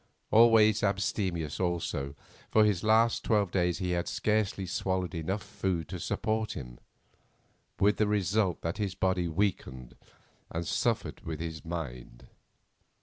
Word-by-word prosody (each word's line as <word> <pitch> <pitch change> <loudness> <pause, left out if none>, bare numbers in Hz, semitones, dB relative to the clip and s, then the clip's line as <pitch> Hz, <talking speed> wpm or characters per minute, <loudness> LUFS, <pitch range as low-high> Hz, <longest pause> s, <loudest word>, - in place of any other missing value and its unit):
Always 110 -2 +6
abstemious, 95 -5 -1
also, 85 -6 -2 0.3
for 110 - +5
this 105 -4 +2
last 115 +2 +3
twelve 105 -5 +2
days 90 -2 +1
he 90 -2 -2
had 85 -1 -1
scarcely 105 -3 0
swallowed 95 0 -2
enough 95 +5 -3
food 95 -5 -2
to 90 0 -5
support 110 +3 -1
him, - - -8 1.0
with 105 +2 +3
the 105 - +2
result 100 -2 +1
that 85 +4 -3
his 100 -3 -2
body 95 -2 +1
weakened 80 -9 -2 0.5
and 85 +1 -3
suffered - - -1
with 80 -2 -5
his 80 -2 -5
mind. 65 -7 -6
95 Hz, 135 wpm, -30 LUFS, 85-105 Hz, 1.0 s, Always